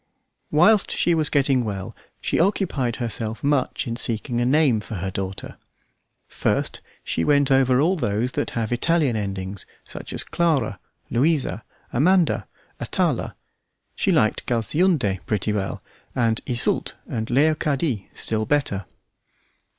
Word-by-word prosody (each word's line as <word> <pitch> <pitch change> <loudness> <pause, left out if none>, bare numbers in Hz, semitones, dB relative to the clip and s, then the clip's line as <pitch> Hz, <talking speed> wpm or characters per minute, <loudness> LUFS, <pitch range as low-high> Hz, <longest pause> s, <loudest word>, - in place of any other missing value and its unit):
Whilst 195 +7 +4
she 175 - +2
was 155 -2 +1
getting 135 -3 +2
well 100 -4 -5 0.2
she - - 0
occupied 165 - +1
herself 115 -2 -3
much 145 -2 +1
in 115 - -3
seeking 120 +1 -2
a 120 - +2
name 140 -4 +4
for 105 +1 -7
her 95 0 -3
daughter. 95 0 -5 0.7
First - - -1 0.2
she 85 - -1
went 140 - +3
over 130 -1 +4
all 170 +6 +3
those 115 - -1
that - - -2
have 115 0 0
Italian 150 -1 +2
endings, 95 -2 -4 0.2
such - - -8
as - - -2
Clara, 145 - 0 0.3
Louisa, 125 - +1 0.3
Amanda, 175 +6 +3 0.3
Atala; - - -1 0.6
she - - +1
liked - - +2
Galsuinde 120 - +1
pretty 105 0 0
well, 100 -2 -3 0.3
and 115 -2 +1
Yseult 125 -2 0
or 110 - -3
Leocadie 140 - +1
still 110 -1 -1
better. 110 -10 0
125 Hz, 130 wpm, -23 LUFS, 110-150 Hz, 0.7 s, Whilst